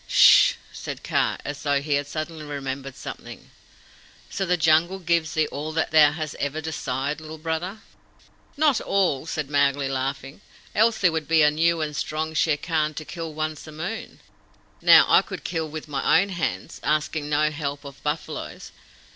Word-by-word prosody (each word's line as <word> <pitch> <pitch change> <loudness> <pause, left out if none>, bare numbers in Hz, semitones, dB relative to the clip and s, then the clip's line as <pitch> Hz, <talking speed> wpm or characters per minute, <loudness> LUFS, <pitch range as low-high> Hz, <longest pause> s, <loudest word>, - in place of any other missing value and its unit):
"Sssh!" - - +7 0.2
said - - -7
Kaa, - - 0
as 145 0 -5
though 145 -2 +1
he 145 +1 -2
had 145 0 0
suddenly 155 +1 -5
remembered 135 -2 -5
something. 125 - -9 0.8
"So 195 0 -2
the 180 +1 +2
Jungle 165 +3 +3
gives 170 -3 0
thee 155 -1 +3
all 150 +2 -4
that 160 - -1
thou 155 -2 +7
hast 155 -1 -5
ever 145 +2 -2
desired, 150 -2 -3
Little 155 0 -8
Brother?" 165 +6 -4 0.8
"Not 295 -4 +3
all," 175 -7 0
said 155 -3 -3
Mowgli, 140 -1 +2
laughing; 135 +4 -4 0.3
"else 220 +1 +3
there 180 -3 +3
would 160 -2 -3
be 160 -1 +4
a 150 - +5
new 165 +2 +1
and 150 -1 -3
strong 155 +1 -3
Shere 155 -1 +2
Khan 155 -1 -1
to 155 - -6
kill 165 -1 -6
once 155 0 -4
a - - -9
moon. 170 +9 -6 0.6
Now, - - +8
I - - +6
could - - -8
kill 160 -2 -3
with 155 +1 -7
my 145 +2 +3
own 200 +2 0
hands, 165 - -3
asking 150 0 -1
no 150 +1 +2
help 145 -1 -5
of 140 -1 -11
buffaloes. 150 +1 -5
155 Hz, 175 wpm, -24 LUFS, 145-165 Hz, 0.8 s, Now